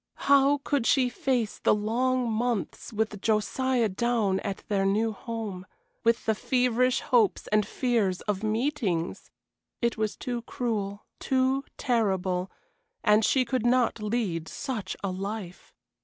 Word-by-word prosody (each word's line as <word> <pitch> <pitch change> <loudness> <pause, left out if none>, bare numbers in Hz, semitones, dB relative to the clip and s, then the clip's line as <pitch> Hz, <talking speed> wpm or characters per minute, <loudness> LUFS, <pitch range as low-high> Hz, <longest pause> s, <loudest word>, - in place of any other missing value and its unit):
How 280 +1 +5
could 280 -5 0
she 255 -3 +4
face 245 -3 -1
the - - +3
long 245 +4 0
months 230 -2 -2
with 215 -2 -2
Josiah 230 +3 +1
down 210 -1 0
at 200 -2 -5
their 200 -2 +1
new 210 +3 +2
home, 210 -4 -6 0.4
with 230 0 +2
the 220 - +3
feverish 250 +2 +1
hopes 230 -5 +2
and 210 -1 +3
fears 225 -8 0
of 205 -2 -2
meetings! 215 - -1 0.5
It 235 -1 0
was 215 -1 -1
too 245 -1 -3
cruel, 210 -4 -3
too 265 +1 +1
terrible; 190 -7 0 0.5
and 210 +1 +5
she 255 +3 +3
could 250 0 -1
not 245 -2 +2
lead 210 -7 -1
such 240 -7 -4
a 195 - -1
life. 195 -1 -6
225 Hz, 135 wpm, -27 LUFS, 205-250 Hz, 0.5 s, How